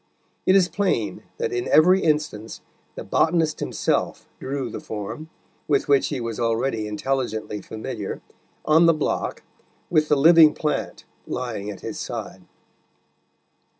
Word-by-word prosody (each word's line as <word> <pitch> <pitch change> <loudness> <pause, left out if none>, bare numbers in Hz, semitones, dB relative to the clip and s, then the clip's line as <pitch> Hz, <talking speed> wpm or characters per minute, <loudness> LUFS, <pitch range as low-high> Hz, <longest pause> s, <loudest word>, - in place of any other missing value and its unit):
It 185 - +6
is 190 -2 +5
plain 200 0 -1 0.2
that 460 -3 -2
in 370 -1 -2
every 180 +5 +5
instance 150 -9 -1 0.3
the - - -6
botanist 160 -2 +1
himself - - -1
drew 135 -1 -3
the - - -5
form, 110 +9 -6 0.4
with 145 -2 +1
which 140 -1 +3
he 145 - -3
was 115 -2 -4
already 115 -1 0
intelligently 110 -2 -3
familiar, 110 0 -6 0.5
on 160 +2 +5
the 165 - +5
block, 155 - -2 0.5
with 155 -3 +2
the 150 - +4
living 160 +1 +7
plant 150 -1 -3 0.2
lying 120 -5 -4
at 100 -3 -8
his 110 - -6
side. 105 -6 -6
135 Hz, 135 wpm, -23 LUFS, 110-160 Hz, 0.5 s, living